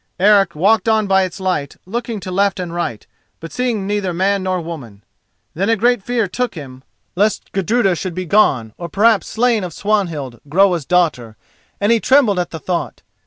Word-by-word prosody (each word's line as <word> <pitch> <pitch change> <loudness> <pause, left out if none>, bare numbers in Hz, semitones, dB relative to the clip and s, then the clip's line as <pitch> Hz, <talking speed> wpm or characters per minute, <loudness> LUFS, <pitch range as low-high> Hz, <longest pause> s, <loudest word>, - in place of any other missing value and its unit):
Eric 195 -3 +4
walked 215 +8 +2
on 220 -1 +2
by 190 -1 +3
its 185 +1 -3
light, 185 -7 -2
looking 230 +2 -4
to 185 - -6
left 195 +1 +1
and 175 -2 -5
right, 145 -11 -4 0.3
but 165 - -9
seeing 240 -6 -1
neither 200 -3 -2
man 195 +2 +1
nor 185 -1 -1
woman. 135 -12 -8 0.5
Then 195 +6 -1
a 230 - +4
great 240 +1 +2
fear 230 0 -1
took 245 +6 -3
him 130 -5 -9 0.3
lest 205 +3 0
Gudruda 195 +1 +1
should 180 0 -5
be 185 0 -3
gone, 135 - +2
or 170 -1 -5
perhaps 210 +1 +3
slain 230 -2 +1
of 175 -3 -5
Swanhild, 165 - -2
Groa's 175 -2 +2
daughter, 150 -11 0 0.4
and 205 +2 +2
he 230 - +4
trembled 245 -7 +3
at 175 - -2
the 160 - -7
thought. 175 +3 -4
190 Hz, 185 wpm, -18 LUFS, 170-215 Hz, 0.5 s, Eric